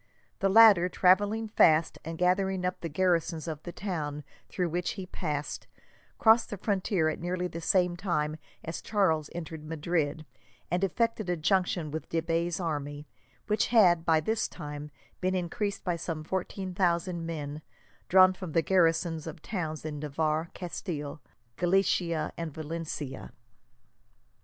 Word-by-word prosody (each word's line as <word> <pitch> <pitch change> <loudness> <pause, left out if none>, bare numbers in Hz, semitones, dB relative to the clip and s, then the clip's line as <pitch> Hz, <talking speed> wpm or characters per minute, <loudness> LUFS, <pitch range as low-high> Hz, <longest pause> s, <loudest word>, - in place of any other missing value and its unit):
The 195 - +2
latter, 200 -4 +7
travelling 205 +5 +3
fast, 160 -6 +4
and 165 +1 -6
gathering 185 +1 +1
up 180 - -2
the 165 - -3
garrisons 170 -1 0
of 155 -2 -4
the 175 - -7
towns 155 -6 -4 0.3
through 180 -2 -1
which 175 +2 -1
he 190 -3 -6
passed, 150 -5 -4 0.5
crossed 225 +1 +5
the 205 - -5
frontier 190 -4 0
at 155 - -2
nearly 180 +1 -2
the 170 -1 -7
same 180 +1 +2
time 155 -5 -1 0.3
as 165 - -5
Charles 165 -8 +1
entered 160 -2 -6
Madrid, 155 -1 -2 0.5
and 175 +2 +1
effected 215 +1 0
a 175 - 0
junction 170 -1 +1
with 160 +1 -5
de 165 - +1
Bay's 170 +2 -1
army; 145 -3 -3 0.4
which 210 0 +1
had, 180 -8 +5
by 160 -2 +4
this 220 +8 0
time, 150 0 -7 0.3
been 185 0 0
increased 200 +3 -2
by 175 -2 -1
some 160 -2 -4
fourteen 190 +2 -3
thousand 175 -1 0
men, 150 -2 -5 0.5
drawn 185 0 +7
from 185 -4 -7
the 165 - +3
garrisons 165 -2 +2
of 155 -1 -8
towns 160 -6 -4
in 150 -2 -4
Navarre, 155 +2 -1
Castile, 160 -5 -5 0.4
Galicia, 175 -3 +1
and 165 -2 -4
Valencia. 155 -3 -6
170 Hz, 145 wpm, -29 LUFS, 155-185 Hz, 0.5 s, latter